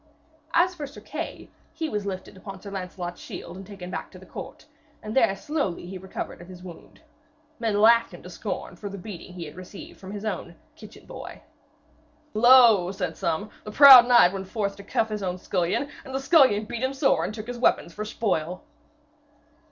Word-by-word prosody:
As 355 +2 +4
for 300 -5 -6
Sir 275 - -12
Kay, - - -7 0.2
he 320 -1 -2
was 210 -6 -3
lifted 190 -1 -6
upon 190 0 -9
Sir 200 +1 -10
Lancelot's 180 -2 -6
shield 170 - -8
and 190 0 -10
taken 190 -3 -9
back - - -5
to - - -14
the - - -14
court, - - -9 0.4
and 215 +1 -6
there 200 -7 +4
slowly 280 - -3
he 185 +1 -7
recovered 190 -1 -7
of 175 - -12
his 180 -1 -12
wound. 175 -3 -13 0.6
Men 220 -3 0
laughed 230 +2 +5
him - - -12
to - - -10
scorn - - -5
for 205 - -7
the 200 - -7
beating 185 -2 -9
he 170 -2 -6
had 150 - -11
received 185 +2 -11
from 190 - -10
his 205 +1 -6
own 175 -4 -4 0.2
'kitchen 320 - -14
boy.' - - -10 0.9
'Lo,' 225 -5 +6
said 180 -4 -4
some, 170 +6 -2
'the 210 - -8
proud 265 -3 +10
knight 240 -7 +6
went 195 -1 -5
forth 200 -1 -2
to 200 - -10
cuff 220 +2 0
his 210 -1 -4
own 185 -2 -2
scullion, 180 +8 -1 0.2
and 265 0 -7
the - - 0
scullion 270 -8 +4
beat 235 +2 -5
him 260 +1 -1
sore 270 0 +2
and 210 - -4
took 215 -1 -7
his 245 0 -6
weapons 170 -7 +2
for 210 - -5
spoil.' 185 -6 -2
205 Hz, 200 wpm, -25 LUFS, 185-240 Hz, 0.9 s, proud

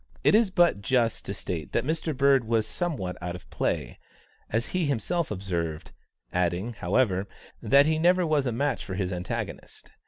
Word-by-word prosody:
It - - +5
is 215 -1 +5
but 175 - +3
just 115 +2 +1
to 100 - -3
state 85 -4 -5
that - - +1
Mr. 160 -1 -2
Bird 140 -2 +4
was 110 -1 +1
somewhat 110 - -3
out 90 0 -4
of 90 - -11
play, - - -2 0.5
as 115 +2 0
he 180 -4 0
himself 160 +5 -1
observed; 85 -6 -3 0.4
adding, 90 +6 0
however, 100 -1 +1 0.3
that 140 +1 +5
he 155 0 +1
never 180 +2 +4
was 150 -4 +1
a - - 0
match 135 +3 -1
for 95 - -5
his 95 -1 -2
antagonist. 90 0 -6
115 Hz, 175 wpm, -27 LUFS, 95-155 Hz, 0.5 s, It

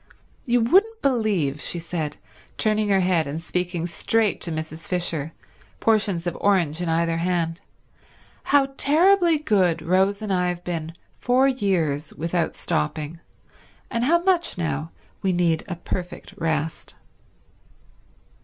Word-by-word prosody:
You 245 -2 +2
wouldn't 405 - +3
believe," 205 - +1
she - - -3
said, 165 -3 -4 0.4
turning 215 -1 +1
her 195 -1 +4
head 175 -4 +2
and 145 +3 -4
speaking 175 0 -2
straight 210 +5 0
to 170 - -3
Mrs. 155 +1 -5
Fisher, 170 -4 -1 0.5
portions 205 -6 +1
of 175 - -2
orange 175 -5 +2
in 175 - -1
either 165 0 +1
hand, 170 0 -1 0.8
"how 275 -1 +3
terribly 340 +3 +4
good 185 - +1
Rose 190 +4 +2
and 205 -2 -1
I 180 -1 +1
have 175 0 -4
been 165 -2 -4 0.3
for 255 +2 +3
years 175 - 0
without 165 +1 -1
stopping, 150 - -2 0.7
and 235 -1 0
how 340 +6 +3
much 360 - +1
now 160 -2 -2 0.3
we 190 - +1
need 170 -2 +1
a 180 - -4
perfect 180 +3 -6
rest." 160 -3 -2
180 Hz, 135 wpm, -23 LUFS, 165-220 Hz, 0.8 s, her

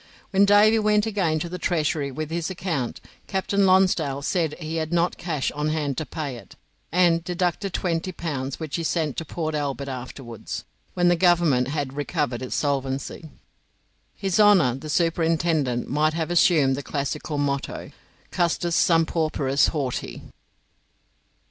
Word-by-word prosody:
When 200 0 +5
Davy 210 +2 +5
went 210 0 +3
again 190 -8 0
to 170 - -2
the 180 +1 -6
Treasury 155 -4 0
with 155 +3 -5
his 170 +1 -2
account, 170 -9 -3 0.3
Captain 195 +1 +1
Lonsdale 175 -7 +3
said 160 -2 0
he 160 0 -4
had 160 0 -2
not 175 +1 +1
cash 155 -6 -2
on 150 +1 -2
hand 150 -3 -1
to 155 - -5
pay 145 -6 -4
it, 100 - -14 0.4
and 170 -1 +3
deducted 180 +2 -1
twenty 175 0 -1
pounds, 140 -6 -4
which 160 -1 -3
he 165 - -3
sent 160 -4 -1
to 165 - -3
Port 155 0 -3
Albert 140 -2 -2
afterwards, 125 -2 -7 0.3
when 175 -1 +3
the 175 - +5
Government 170 -8 +3
had 140 -2 -3
recovered 130 -4 -2
its 130 - -4
solvency. 140 +2 -2 0.9
His 195 0 -1
Honour 200 - +6
the 155 - -8
Superintendent 160 -5 +1
might 155 +3 +1
have 165 0 -2
assumed 160 -6 +4
the 140 - -4
classical 145 +2 -3
motto, 140 -1 -2 0.4
"Custos 175 -1 0
sum 165 -1 +4
pauperis 150 -4 +1
horti." 140 -6 -3
160 Hz, 150 wpm, -24 LUFS, 140-175 Hz, 0.9 s, Honour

